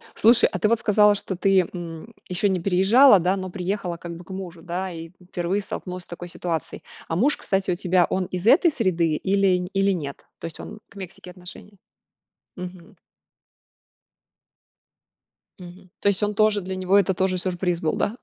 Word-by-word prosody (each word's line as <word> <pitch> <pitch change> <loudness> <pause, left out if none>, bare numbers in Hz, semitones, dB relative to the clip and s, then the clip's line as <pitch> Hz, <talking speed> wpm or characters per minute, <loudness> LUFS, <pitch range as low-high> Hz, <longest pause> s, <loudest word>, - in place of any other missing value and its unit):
Слушай, 235 +2 +5
а - - -3
ты 215 - +2
вот 230 0 +2
сказала, 210 -1 +4
что 195 -1 -5
ты, 190 +1 +3
м, 175 +4 -8 0.2
еще 185 +3 +1
не 190 -1 0
переезжала, 195 +6 +6
да, 180 +3 +1
но 185 -1 -5
приехала 180 -1 -3
как 170 0 -8
бы 170 - -11
к - - -23
мужу, 180 -3 -7
да, 180 +3 -4
и 165 -1 -8 0.2
впервые 180 +4 -1
столкнулась 180 -2 -6
с - - -23
такой 175 0 -8
ситуацией. 170 -2 -4 0.2
А 165 - -2
муж, 260 - +2
кстати, 195 -1 -1
у - - 0
тебя 180 0 +2
он 185 0 0
из 180 +3 -4
этой 340 +7 +6
среды 175 - +1
или 190 0 +1
или 195 0 +2
нет? 145 -7 -5
То - - -7
есть 165 - -7
он 215 - -9
к - - -20
Мексике 185 -2 -9
отношение 180 +3 -12 0.8
мгм. 180 -1 -9 2.6
Мгм. 180 +1 -13
То - - -1
есть 200 0 0
он 210 0 0
тоже 215 -1 +3
для 190 +1 -5
него 185 +1 +2
это 195 -1 +3
тоже 185 0 0
сюрприз 180 -1 -2
был, 155 - 0
да? 210 - -1
185 Hz, 185 wpm, -23 LUFS, 175-200 Hz, 2.6 s, переезжала